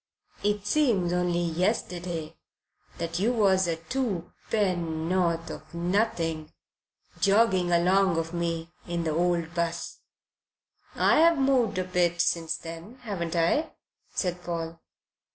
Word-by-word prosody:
It 205 0 0
seems 205 - +2
only 175 -1 +1
yesterday 170 -2 -2 0.6
that 170 +1 -3
you 220 +5 +2
was 190 -5 +3
a 165 - 0
two 195 0 -3 0.2
penn'orth 170 -3 0
of 155 +2 -10
nothing 170 -4 0 0.7
jogging 195 -3 +3
along 180 +1 +3
o' 165 +1 -2
me 170 -1 -2 0.2
in 170 -1 -2
the 160 - 0
old 170 0 0
'bus." 170 -1 -2 1.0
"I've 330 +1 +5
moved 265 -7 +2
a 185 - +1
bit 175 -1 +1
since 165 -1 +1
then, 165 +7 -9
haven't 175 -7 -3
I?" 170 - +1 0.4
said 180 -1 -2
Paul. 165 -1 -4
175 Hz, 115 wpm, -27 LUFS, 165-195 Hz, 1.0 s, I've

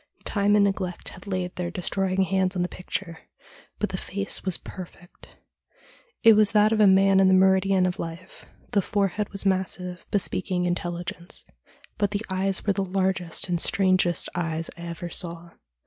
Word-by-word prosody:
Time 205 0 +2
and 205 -1 +5
neglect 190 -3 -2
had 185 +2 -12
laid 185 -2 -3
their 175 -1 -3
destroying 190 +1 0
hands 190 0 0
on 180 - 0
the - - -1
picture, 180 -2 -5 0.6
but - - -1
the - - -3
face 100 - -3
was 185 -3 +1
perfect. 175 -1 -11 0.9
It 225 - +9
was 210 -1 +4
that 210 0 +5
of 220 -1 +2
a 205 - +7
man 195 0 +5
in 190 - +5
the 190 - +5
meridian 190 0 +4
of 180 -1 -2
life; 170 +2 -8 0.2
the 200 - +3
forehead 200 +1 -1
was 200 0 -2
massive, 185 -1 -2
bespeaking 185 -2 0
intelligence, 175 0 -4 0.5
but 205 -1 +2
the 205 +2 -3
eyes 190 +1 0
were 205 - +2
the 195 - -1
largest 190 -2 -1
and 175 -2 -1
strangest 185 -3 +2
eyes 165 -2 -2
I 170 0 -9
ever 170 0 -6
saw. 170 -1 -4
185 Hz, 170 wpm, -25 LUFS, 175-195 Hz, 0.9 s, It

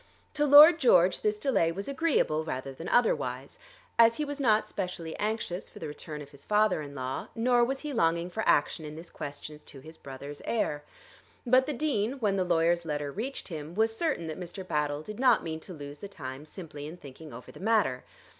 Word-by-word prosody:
To 295 -1 +1
Lord 305 +4 +9
George 185 - +4
this 210 0 0
delay 210 -8 +1
was 195 +4 -5
agreeable 275 - +1
rather 135 -3 -5
than 165 +6 -7
otherwise, 140 - 0 0.4
as 230 0 +7
he 300 - -2
was 290 0 -5
not 220 -5 +3
specially 180 -4 -5
anxious 210 -4 -3
for - - -15
the 160 - -6
return 150 0 -7
of 145 - -15
his 140 - -15
father 210 -5 +2
in 140 -1 -9
law, 130 -1 -4
nor 240 +1 +3
was 270 +3 -1
he 300 -2 -5
longing 170 -4 +1
for 220 - -3
action 145 +2 +2
in 150 0 -7
this 165 +2 -10
question 145 +1 -7
as - - -23
to 135 - -12
his 160 +4 -13
brother's 140 +2 -9
heir. 150 -10 -1 0.6
But 255 +2 +4
the 300 - -1
Dean, 250 -5 0
when 215 -8 0
the 190 - +1
lawyer's 170 0 +2
letter 145 -3 -3
reached 235 - -5
him, 160 0 -7
was 225 +1 +1
certain 300 - -1
that 160 +1 -6
Mr. 185 +1 -7
Battle 150 -1 -1
did 210 +5 -8
not 260 0 +4
mean 160 -1 -4
to 185 - -11
lose 145 -3 -8
the 200 - -7
time 140 -6 -8
simply 150 -4 -9
in 165 +3 -9
thinking 150 +1 -12
over 125 +2 -10
the - - -14
matter. 200 - +1
175 Hz, 210 wpm, -29 LUFS, 150-225 Hz, 0.6 s, Lord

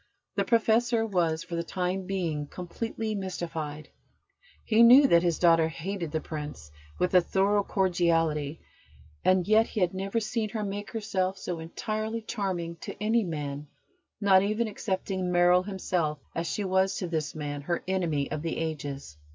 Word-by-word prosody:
The - - +1
Professor 230 0 +2
was, 170 -6 0
for - - -10
the 170 - 0
time 180 +2 -2
being, 165 -6 -2
completely 215 +6 -4
mystified. 165 -6 -5 0.8
He 220 0 +4
knew 250 +5 +9
that 170 -10 +5
his 170 -2 +1
daughter 165 -2 +5
hated 170 0 -4
the 160 - 0
Prince 150 - -7 0.3
with 180 - 0
a 180 - +7
thorough 195 +3 +2
cordiality, 165 -6 +1 0.6
and 185 -1 +3
yet 220 +1 +5
he - - -4
had 180 -2 +2
never 195 +4 -1
seen 220 0 -2
her 215 0 -3
make 205 +1 -4
herself 195 -4 -1
so 180 -2 -4
entirely 215 +7 -3
charming 185 -7 -3
to - - -7
any 220 +2 +2
man, 150 -4 -4 0.5
not 195 -2 +5
even 215 +3 0
excepting 190 -3 -2
Merrill 175 +1 +5
himself, 180 -5 -2 0.2
as 165 +1 -2
she 210 - -2
was 190 0 +2
to 180 - -3
this 160 -3 -2
man, 145 -1 -4
her 170 +4 -2
enemy 170 -7 0
of 155 - -2
the 165 0 -3
Ages. 145 - -4
180 Hz, 160 wpm, -28 LUFS, 165-205 Hz, 0.8 s, knew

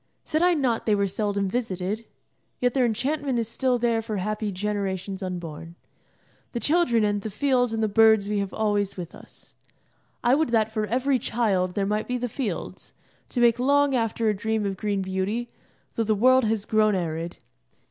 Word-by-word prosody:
Said 310 - -1
I 355 0 +4
not 250 -7 0
they 210 - +4
were 200 0 +1
seldom 200 0 -1
visited? 210 -1 -3 0.5
Yet 245 -1 +1
their 255 -3 +3
enchantment 265 +4 -1
is 230 -2 -1
still 250 +2 0
there 235 -1 +1
for 215 -2 -4
happy 210 +2 -2
generations 195 -1 -3
unborn. 170 -3 -6 0.8
The 240 - -1
children 290 -7 +2
and 205 -1 +1
the 220 - -4
fields 245 +2 +1
and 225 0 -1
the - - +3
birds 220 -1 +5
we 210 0 0
have 200 -1 -2
always 205 -2 0
with 175 -2 -6
us. - - -15 0.7
I 240 +1 +4
would 310 +1 +2
that 220 -2 +2
for 215 -1 -1
every 260 +4 +1
child 195 -6 0
there 200 - +1
might 210 +2 -1
be 250 - -1
the 245 0 -2
fields, 245 0 -5 0.3
to 250 - -3
make 235 0 +4
long 285 +2 +3
after 230 -2 0
a 215 - +3
dream 220 +1 -1
of 195 -1 -2
green 200 -1 -1
beauty, 190 +6 -2 0.4
though 230 - 0
the 215 0 +1
world 255 +3 +5
has 215 -1 0
grown 215 -2 +3
arid. 165 -1 -3
220 Hz, 190 wpm, -25 LUFS, 200-245 Hz, 0.8 s, birds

